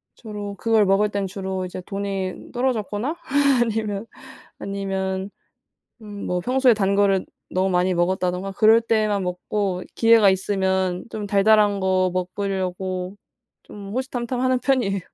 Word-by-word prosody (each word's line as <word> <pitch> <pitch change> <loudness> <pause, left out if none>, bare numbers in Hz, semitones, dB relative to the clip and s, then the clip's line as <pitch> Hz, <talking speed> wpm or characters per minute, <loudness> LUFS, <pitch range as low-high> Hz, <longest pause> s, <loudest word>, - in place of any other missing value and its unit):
주로 205 -3 -7
그걸 220 +1 +2
먹을 195 +2 +3
때는 200 -1 -2
주로 190 -1 -4
이제 185 0 -7
돈이 195 -2 -4
떨어졌거나 245 - -1 0.5
아니면 215 -2 -2 0.5
아니면 195 -1 -3 0.7
음 205 -2 -8
뭐 180 0 -1
평소에 255 +4 +3
단 200 -2 +1
거를 195 -2 +3 0.3
너무 190 +1 +1
많이 180 0 +2
먹었다던가 180 +2 0
그럴 220 +3 +5
때만 215 -3 +1
먹고 180 +1 -2
기회가 225 -3 +5
있으면 190 -1 0
좀 210 -1 -5
달달한 205 0 +4
거 185 -1 +2
먹으려고 185 0 -3 0.5
좀 200 -1 -10
호시탐탐 250 -1 -3
하는 255 0 +2
편이에요. 245 -8 +1
200 Hz, 295 characters per minute, -23 LUFS, 190-215 Hz, 0.7 s, 그럴